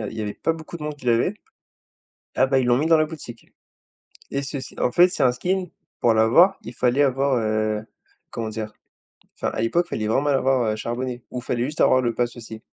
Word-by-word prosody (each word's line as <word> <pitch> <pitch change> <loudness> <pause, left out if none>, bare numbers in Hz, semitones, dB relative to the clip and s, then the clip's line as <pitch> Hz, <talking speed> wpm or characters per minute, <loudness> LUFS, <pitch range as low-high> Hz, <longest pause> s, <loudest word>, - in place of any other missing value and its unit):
a - - -3
il - - -8
y - - -2
avait 105 -1 -3
pas 165 - 0
beaucoup 160 +1 -8
de 160 - -11
monde 150 0 -3
qui 135 -4 -13
l'avait. 120 - +2 1.0
Ah 130 - +3
bah, 135 0 +2
ils 130 - +1
l'ont 120 +1 +3
mis 155 - 0
dans 165 -1 +5
la 155 - +3
boutique 150 -7 -9 0.9
et 140 - -1
ceci 135 -1 -6
en 125 - +1
fait, 180 +1 +6
c'est - - -1
un 125 -1 +4
skin, 185 +7 -1 0.3
pour 120 - +3
l'avoir 125 - +5
il 115 +3 -8
fallait 125 +4 +2
avoir, 135 0 +1
heu, 110 -1 -1 0.4
comment 115 -1 -4
dire? 110 -1 -5 0.6
Enfin - - -2
à - - -3
l'époque, 170 +10 +1
il - - -24
fallait 110 - -2
vraiment 115 +5 +2
mal 145 -1 +2
avoir 125 -5 +1
charbonné 120 +1 -4
ou 125 - -4
il - - -10
fallait 120 -1 -1
juste 150 +2 -3
avoir 130 - +5
le 120 -2 0
pass, 120 +1 -1
aussi 110 -1 -9
125 Hz, 235 wpm, -23 LUFS, 115-145 Hz, 1.0 s, fait